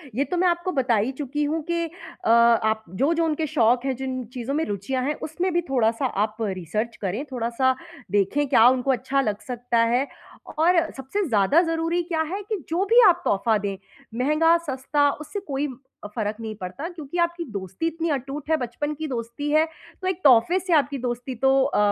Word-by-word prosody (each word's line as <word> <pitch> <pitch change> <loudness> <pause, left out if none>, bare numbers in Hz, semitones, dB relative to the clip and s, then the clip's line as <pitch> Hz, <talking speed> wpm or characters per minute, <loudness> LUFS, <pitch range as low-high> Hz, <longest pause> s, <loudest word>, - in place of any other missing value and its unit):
ये 270 - +2
तो 360 - 0
मैं 365 +1 +3
आपको 345 +1 0
बता 250 -3 +3
ही 215 +5 +1
चुकी 295 +1 -2
हूँ 315 +2 -1
कि 340 +1 -1
अ, 345 0 -8
आप 230 -2 +4
जो-जो 300 - +1
उनके 315 0 0
शौक 245 -3 +2
हैं, 265 -1 0
जिन 260 -1 -3
चीज़ों 250 +1 -4
में 315 - +1
रुचियाँ 210 +6 -2
हैं, 295 - 0
उसमें 350 +4 -2
भी 345 - +2
थोड़ा-सा 235 -1 +1 0.2
आप 215 0 -3
रिसर्च 210 +3 -2
करें, 205 +6 -2
थोड़ा-सा 250 +2 +1 0.4
देखें, 205 +9 +1
क्या 240 -4 +6
उनको 260 +1 +1
अच्छा 270 +2 0
लग 210 -5 -2
सकता 245 -1 -2 0.2
है, 260 +3 +2 0.5
और 340 +1 +5 0.2
सबसे 270 +11 -2
ज़्यादा 225 - +4
ज़रूरी 330 +1 0
क्या 330 -2 -1
है 400 - -3
कि 430 - 0
जो 340 +4 +1
भी 465 +4 +6
आप 355 0 +2
तोहफ़ा 215 +2 +2
दें, 200 -1 -3 0.5
महँगा, 325 +4 +4
सस्ता, 285 +2 +1
उससे 305 +8 -6
कोई 280 0 -1 0.4
अ, - - -3
फ़र्क़ 215 -1 -2
नहीं 220 -1 -5
पड़ता, 190 - -5
क्योंकि 335 -2 -7
आपकी 340 0 0
दोस्ती 195 - -3
इतनी 330 +1 -2
अटूट 275 +2 -4
है, 320 - +4
बचपन 255 +4 -3
की 315 +2 -4
दोस्ती 240 +2 -4
है, 310 +1 +4 0.4
तो 370 - -2
एक 375 -2 -1
तोहफ़े 265 +8 +6
से 370 -1 -1
आपकी 285 -2 +2
दोस्ती 245 +1 -4
तो 270 +3 +3
अ - - -1
270 Hz, 195 wpm, -24 LUFS, 235-325 Hz, 0.5 s, क्या